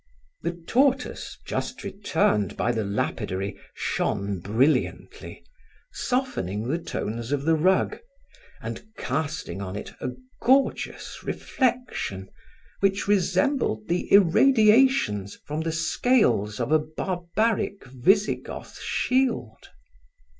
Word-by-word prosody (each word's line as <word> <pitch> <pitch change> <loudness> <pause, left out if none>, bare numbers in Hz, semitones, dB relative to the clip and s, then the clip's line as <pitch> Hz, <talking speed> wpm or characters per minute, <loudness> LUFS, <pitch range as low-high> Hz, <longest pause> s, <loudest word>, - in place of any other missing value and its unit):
The 170 - -2
tortoise, 270 +4 +1
just - - -4
returned 160 - 0
by 120 - +1
the 110 -2 -1
lapidary, 100 -1 -2 0.2
shone 100 -2 -1
brilliantly, 115 - 0 0.5
softening 120 - -2
the 160 +6 0
tones 115 -6 -4
of 145 -1 0
the 165 - +4
rug 185 +4 +2 0.6
and - - -5
casting 145 -5 -3
on 95 -1 -5
it 105 - -7
a 130 - -2 0.3
gorgeous 265 +2 +1
reflection 245 - -2 0.5
which 195 0 +1
resembled 205 - +1
the 175 +1 -1
irradiations 215 - +5
from 150 +2 -3
the 165 0 -1
scales 160 - +2
of - - -1
a 155 - +6
barbaric 185 +6 -1
Visigoth 185 - 0
shield. 250 - -1
160 Hz, 100 wpm, -25 LUFS, -, 0.6 s, a